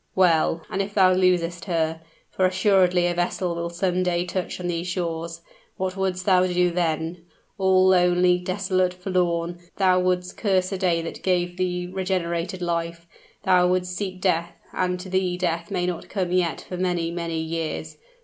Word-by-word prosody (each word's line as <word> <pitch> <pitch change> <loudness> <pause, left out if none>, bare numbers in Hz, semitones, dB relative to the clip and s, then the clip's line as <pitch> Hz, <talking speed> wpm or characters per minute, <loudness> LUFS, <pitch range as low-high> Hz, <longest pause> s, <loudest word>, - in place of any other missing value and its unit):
Well 165 -3 +3
and 195 - 0
if 205 +1 -5
thou 185 -2 +5
losest 180 -2 +1
her? 160 -3 -1 0.3
for 185 - +2
assuredly 185 -1 +3
a 175 - +1
vessel 175 0 -1
will 170 0 -3
some 180 +1 0
day 175 -1 0
touch 180 0 -4
on 180 - -5
these 175 0 -2
shores 170 -2 -3 0.4
what 185 0 -2
would'st 185 -2 -2
thou 185 -2 +4
do 180 0 +2
then? 165 0 -1 0.4
All 190 0 +4
lonely, 180 0 +4
desolate, 185 0 0
forlorn, 175 -2 -1 0.2
thou 185 -2 +4
would'st 180 0 -1
curse 190 -3 +1
the 195 - -3
day 170 -3 +1
that 165 - -7
gave 175 -1 0
thee 180 -1 -1
regenerated 180 -1 -2
life 170 0 -2 0.4
thou 180 -1 +4
would'st 180 0 0
seek 185 -1 -4
death 170 -2 0 0.2
and 180 0 -1
to 190 - -8
thee 185 -1 0
death 170 -2 -2
may 180 -3 -1
not 180 -2 -4
come 185 -4 -2
yet 180 -3 +1
for 180 - -5
many, 175 -2 0
many 170 -1 -3
years! 160 0 -4
180 Hz, 170 wpm, -24 LUFS, 170-185 Hz, 0.4 s, thou